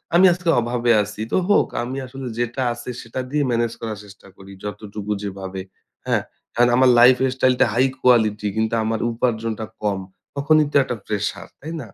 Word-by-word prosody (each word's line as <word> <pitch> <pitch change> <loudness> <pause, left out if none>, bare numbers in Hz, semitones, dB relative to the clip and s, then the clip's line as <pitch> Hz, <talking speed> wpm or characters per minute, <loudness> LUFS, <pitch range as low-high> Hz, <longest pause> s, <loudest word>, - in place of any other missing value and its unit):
"আমি 180 +2 +7
আজকে 175 -1 -3
অভাবে 120 0 0
আছি 105 +1 -8
তো - - +1
হোক 205 - +4 0.2
আমি 130 +3 -5
আসলে 130 +1 -8
যেটা 120 +2 -2
আছে - - -9
সেটা 115 +3 -6
দিয়ে 145 +1 0
ম্যানেজ 115 0 0
করার 110 -2 -4
চেষ্টা 100 0 -16
করি 95 0 -13
যতটুকু 105 0 -6
যেভাবে" 95 -1 -5 0.4
হ্যাঁ? - - +1 0.3
অ্যান 120 +1 +4
আমার 130 +1 +5
lifestyle 130 +1 +4
টা - - +7
high 130 +2 +3
quality 110 -4 +3
কিন্তু 110 +1 0
আমার 110 0 -1
উপার্জনটা 115 -2 -2 0.2
কম। 100 -2 0 0.4
তখনই 150 +2 +3
তো - - -11
একটা 125 - -4
প্রেশার, 105 -1 -3
তাই 160 +4 -7
না? 120 - -9
120 Hz, 175 wpm, -21 LUFS, 105-130 Hz, 0.4 s, আমি